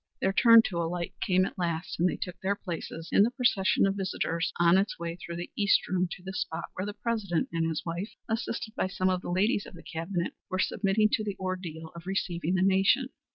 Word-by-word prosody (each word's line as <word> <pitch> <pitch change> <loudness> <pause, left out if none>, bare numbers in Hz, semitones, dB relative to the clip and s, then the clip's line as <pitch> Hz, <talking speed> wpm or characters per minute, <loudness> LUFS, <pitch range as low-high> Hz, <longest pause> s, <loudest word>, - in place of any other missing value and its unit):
Their 190 - +1
turn 230 +1 +8
to 180 - -3
alight 170 +1 -2
came 185 0 +3
at - - -7
last, 170 -1 -2
and 180 +2 +4
they - - -2
took 180 - -6
their 195 +2 +1
places 170 -3 -6
in - - +5
the 215 - +5
procession 225 -8 +2
of 195 - +2
visitors 180 -3 -1
on 175 +2 +6
its 200 +2 -1
way 170 0 -4
through 170 -1 -7
the 175 +1 -6
East 200 -2 +3
room 185 0 +1
to 180 - -11
the 190 +1 -6
spot 165 -2 -3
where 185 +2 -4
the 205 - -5
President 215 -8 -1
and 165 -1 0
his 160 -1 -3
wife, 175 +5 -3 0.2
assisted 225 -1 -3
by 185 - 0
some 185 0 0
of 180 -1 -1
the - - -6
ladies 200 +4 +1
of - - -12
the - - -12
Cabinet, 170 +2 -3 0.2
were 185 - -1
submitting 200 +3 +2
to 215 - +1
the 205 -2 -4
ordeal 180 -4 -5
of 170 +1 -10
receiving 180 -2 -1
the 185 - +2
nation. 195 +8 +3
185 Hz, 230 wpm, -29 LUFS, 170-200 Hz, 0.2 s, turn